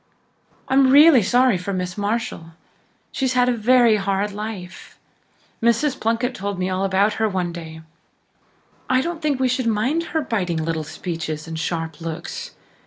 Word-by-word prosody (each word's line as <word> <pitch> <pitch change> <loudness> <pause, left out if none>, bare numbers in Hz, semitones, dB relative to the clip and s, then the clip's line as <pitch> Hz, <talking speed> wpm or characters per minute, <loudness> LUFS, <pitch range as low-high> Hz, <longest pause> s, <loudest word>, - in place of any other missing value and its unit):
I'm 265 0 +4
really 285 -1 +7
sorry 245 0 +3
for 195 +2 -4
Miss 180 -1 -3
Marshall. 205 -6 -3 0.6
She's 260 -1 -1
had 250 0 +3
a - - +3
very 235 -1 +4
hard 200 +1 -1
life. 200 -3 -8 0.6
Mrs. 235 +5 +1
Plunkett 230 +3 0
told 200 -3 -4
me 185 +1 -2
all 185 +1 -1
about 195 +2 +2
her 220 - +2
one 180 -3 -2
day. 160 -2 -8 1.1
I 255 0 +3
don't 335 +2 -4
think 295 -4 0
we 260 - +2
should 255 -1 -1
mind 255 +10 0
her 320 -1 -1
biting 190 - -2
little 160 0 -2
speeches 160 0 -5
and 160 -1 -5
sharp 165 -1 -4
looks. 165 +1 -6
210 Hz, 160 wpm, -21 LUFS, 180-255 Hz, 1.1 s, really